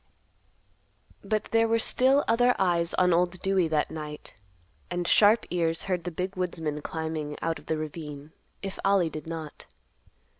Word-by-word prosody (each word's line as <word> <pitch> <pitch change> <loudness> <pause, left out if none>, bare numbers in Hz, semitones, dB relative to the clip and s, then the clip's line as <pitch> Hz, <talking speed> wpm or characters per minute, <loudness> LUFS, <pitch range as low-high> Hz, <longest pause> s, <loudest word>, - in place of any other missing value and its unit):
But 215 +1 0
there 225 0 +4
were 230 0 +2
still 265 +5 +4
other 245 +2 +4
eyes 170 -2 +1
on 180 -1 +3
Old 175 +1 +1
Dewey 190 -3 +2
that 155 -2 0
night, 150 -1 -7 0.5
and 175 0 -2
sharp 215 +2 +5
ears 165 -2 0
heard 180 -3 -2
the - - -1
big 185 +4 -4
woodsman 165 -5 -3
climbing 160 -1 -4
out 165 0 -2
of - - -20
the 160 - 0
ravine, 150 -1 -7 0.3
if 195 -1 -5
Ollie 195 -4 +3
did 155 0 -7
not. 160 -2 -7
175 Hz, 155 wpm, -27 LUFS, 160-195 Hz, 0.5 s, sharp